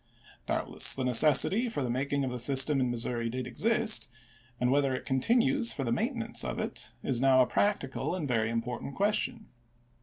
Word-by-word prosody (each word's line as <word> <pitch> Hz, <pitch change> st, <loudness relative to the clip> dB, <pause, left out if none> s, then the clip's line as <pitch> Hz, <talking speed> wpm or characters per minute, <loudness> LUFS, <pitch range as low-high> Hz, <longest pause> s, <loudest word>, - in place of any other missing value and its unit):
Doubtless, -, -, +1 dB
the 130 Hz, -, -3 dB
necessity 150 Hz, -, +4 dB
for 215 Hz, -11 st, -3 dB
the 125 Hz, -, -3 dB
making 140 Hz, +3 st, -2 dB
of 130 Hz, -, -3 dB
the 125 Hz, -, -5 dB
system 135 Hz, +3 st, +5 dB
in 125 Hz, -1 st, 0 dB
Missouri 120 Hz, -1 st, -2 dB
did 130 Hz, +2 st, -5 dB
exist; 220 Hz, -, +1 dB, 0.5 s
and 125 Hz, 0 st, 0 dB
whether 140 Hz, -1 st, +1 dB
it -, -, -7 dB
continues 235 Hz, -, +1 dB
for 135 Hz, -, -4 dB
the 120 Hz, -, -3 dB
maintenance 120 Hz, -, -2 dB
of -, -, -5 dB
it, -, -, -4 dB
is 125 Hz, -2 st, -1 dB
now 130 Hz, -1 st, +4 dB
a -, -, -1 dB
practical 180 Hz, -2 st, -2 dB
and 165 Hz, -6 st, -4 dB
very 115 Hz, -3 st, 0 dB
important 120 Hz, +3 st, -5 dB
question. 215 Hz, +2 st, -1 dB
135 Hz, 180 wpm, -29 LUFS, 125-195 Hz, 0.5 s, system